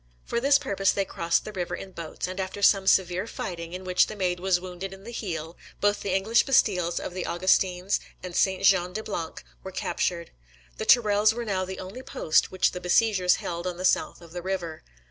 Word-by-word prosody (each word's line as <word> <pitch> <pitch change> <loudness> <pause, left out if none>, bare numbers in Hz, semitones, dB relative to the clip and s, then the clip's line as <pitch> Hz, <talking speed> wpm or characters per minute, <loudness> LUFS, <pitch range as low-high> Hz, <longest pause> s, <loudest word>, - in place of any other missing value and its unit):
For 235 - -1
this 280 +3 +5
purpose 195 -6 +1
they 195 - -1
crossed 170 -2 0
the 215 - -6
river 175 -2 -3
in 190 - -9
boats, 170 -3 -5
and 185 +1 -6
after 190 +2 -4
some 195 -1 +5
severe 185 +2 +3
fighting, 170 -5 -6
in 185 +1 -6
which 180 -1 +3
the 215 - -7
Maid 180 -3 -1
was 185 -1 +2
wounded 185 +1 -7
in 195 - -16
the 235 - -8
heel, 170 -7 -5 0.2
both 205 0 +2
the 200 - -2
English 215 +4 +3
bastilles 180 -10 +2
of - - -6
the 185 -1 -4
Augustins 185 +1 +1 0.2
and 180 -1 -7
St. 190 0 +2
Jean 180 -2 +4
de 220 - -4
Blanc 170 -7 -5 0.2
were 190 - -8
captured. 170 -2 -2 0.5
The - - -4
Tourelles 215 -2 +5
were 240 0 -4
now 190 -3 -1
the 190 +1 -7
only 190 +7 -7
post 160 -10 +1
which 185 -1 +1
the 180 - -7
besiegers 185 0 +3
held 170 +1 -4
on 180 -1 -4
the 185 - -3
south - - +1
of 170 -1 -14
the 175 +1 -5
river. 175 -4 -4
185 Hz, 215 wpm, -26 LUFS, 175-200 Hz, 0.5 s, this